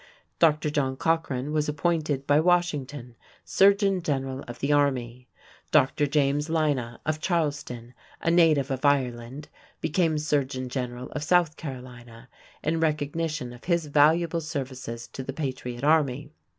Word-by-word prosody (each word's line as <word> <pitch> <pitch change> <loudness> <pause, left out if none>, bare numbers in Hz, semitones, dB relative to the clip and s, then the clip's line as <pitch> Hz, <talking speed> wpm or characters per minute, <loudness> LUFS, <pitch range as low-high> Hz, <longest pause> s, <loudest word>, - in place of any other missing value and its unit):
Dr. 150 -2 +3
John 135 -3 -1
Cochran 150 -4 -1
was 150 -1 0
appointed 150 -2 -1
by 145 +1 +4
Washington 145 -8 0 0.3
surgeon 195 -1 +3
general 135 -3 -2
of 120 0 -7
the 140 +4 -1
army. 125 -4 0 0.4
Dr. 145 +3 +3
James 145 +1 +1
Lynah 145 -8 0
of 155 0 -1
Charleston, 145 -9 -2 0.3
a 165 - 0
native 155 -5 +4
of 130 +1 -3
Ireland, 130 0 0 0.3
became 160 -1 +1
surgeon 140 -4 -1
general 125 -1 -5
of 150 - -4
South 165 0 +2
Carolina 125 -5 -9 0.3
in 160 +2 0
recognition 155 -3 -1
of 120 - -14
his 170 -2 +1
valuable 160 +3 +3
services 130 -6 -5
to - - -7
the 135 +1 -5
patriot 130 -4 -5
army. 145 -2 +2
145 Hz, 135 wpm, -26 LUFS, 130-160 Hz, 0.4 s, by